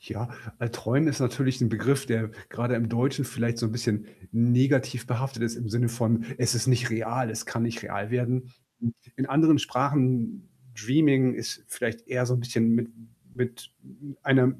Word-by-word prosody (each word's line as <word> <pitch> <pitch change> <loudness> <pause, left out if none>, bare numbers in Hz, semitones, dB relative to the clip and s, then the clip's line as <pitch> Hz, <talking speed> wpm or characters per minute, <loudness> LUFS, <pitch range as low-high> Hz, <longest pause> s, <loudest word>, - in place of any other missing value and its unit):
Ja, 110 +3 -6 0.3
äh, 120 -2 -2
träumen 125 +6 +1
ist 145 - 0
natürlich 130 +1 +1
so 125 - +3
'n - - +2
Begriff, 135 +5 +1
der 115 -3 0 0.2
grade 120 +2 -1
im 115 -1 0
Deutschen 135 +4 0
vielleicht 115 -1 -2
so 115 - -1
'n 110 - -1
bisschen 115 -3 -1 0.2
negativ 125 +1 +2
behaftet 125 0 -2
ist 115 -1 -1
im 120 -2 -5
Sinne 120 +2 +1
von, 115 -1 +1
„es 125 -1 +2
ist 120 +1 0
nicht 120 -1 +3
real, 115 +2 -1
es 110 0 -5
kann 115 - -2
nicht 115 0 -2
real 105 +1 -4
werden.“ 125 0 -1 0.3
I 115 - +1 0.2
In 130 - -1
anderen 155 +3 +5
Sprachen 135 - 0 0.3
dreaming 130 +2 +4
ist - - -5
vielleicht 115 +1 -4
eher 125 0 0
so 125 - 0
'n 125 - +2
bisschen 120 -1 +1
mit 115 0 0 0.5
mit 125 -1 -4 0.5
einer 135 -2 +5
120 Hz, 185 wpm, -27 LUFS, 115-130 Hz, 0.5 s, anderen